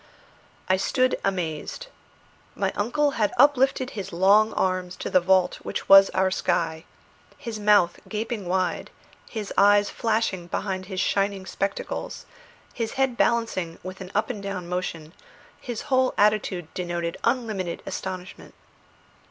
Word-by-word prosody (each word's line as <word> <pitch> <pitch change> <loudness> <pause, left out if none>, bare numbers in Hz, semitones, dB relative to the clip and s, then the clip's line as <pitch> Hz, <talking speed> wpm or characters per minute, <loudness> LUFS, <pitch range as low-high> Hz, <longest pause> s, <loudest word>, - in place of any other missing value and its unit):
I 185 - +3
stood 255 +6 +1
amazed. 180 - -3 0.7
My - - 0
uncle 285 +8 +1
had 210 - +3
uplifted 265 -1 +3
his 195 -3 -6
long 200 +5 +4
arms 185 -1 -1
to - - -5
the 185 - +6
vault 185 0 +2
which - - -5
was 195 0 +9
our 190 0 +1
sky; 165 -3 -1 0.5
his 225 -2 -6
mouth 205 -4 +4
gaping 215 -2 -4
wide, 185 0 -1 0.4
his 215 -3 -5
eyes 205 0 +5
flashing 215 -6 -1
behind 185 0 -3
his 190 -2 -4
shining 195 0 0
spectacles, 195 +1 -4 0.5
his 225 -2 -3
head 265 -2 +1
balancing 225 -9 0
with 185 +1 -8
an 185 - -7
up 215 +4 +1
and 210 -5 -7
down 195 -3 -5
motion, 170 -3 -4 0.5
his 240 -3 -5
whole 260 -1 +1
attitude 200 -5 +1
denoted 175 -2 -3
unlimited 215 -8 -1
astonishment. 185 -1 -7
195 Hz, 135 wpm, -25 LUFS, 185-220 Hz, 0.7 s, was